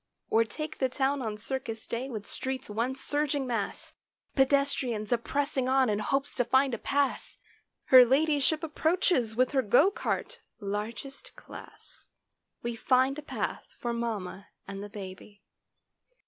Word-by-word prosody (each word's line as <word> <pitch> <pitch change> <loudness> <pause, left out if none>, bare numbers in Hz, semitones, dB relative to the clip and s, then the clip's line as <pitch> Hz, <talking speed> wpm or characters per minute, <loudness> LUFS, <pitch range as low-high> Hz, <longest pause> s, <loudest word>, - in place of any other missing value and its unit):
Or 225 - +5
take 305 +7 -6
the 260 - +2
town 270 +1 0
on 215 -3 -3
circus 225 -1 -4
day 245 +3 -3
with 215 -5 -5
streets 260 -4 -3
one 235 +5 -1
surging 290 0 0
mass; 230 -5 -3 0.4
Pedestrians 270 -5 +1
a 240 - +4
pressing 275 0 -1
on 260 -3 +4
in 205 - 0
hopes 275 +6 -1
to 245 - +1
find 260 +2 +3
a 230 - -2
pass; 280 -1 -1 0.5
Her 255 -1 +9
ladyship 295 +4 +2
approaches 315 - +1
with 255 +1 +2
her 270 -2 +3
go 260 - +5
cart—largest 225 - -5
class— - - -13 0.6
We 235 0 -2
find 260 +4 +2
a - - -6
path 295 - -5
for 240 -1 -2
mamma 210 -5 -4 0.2
and 195 0 -6
the 205 - -7
baby. 200 0 -10
255 Hz, 145 wpm, -29 LUFS, 220-280 Hz, 0.6 s, Her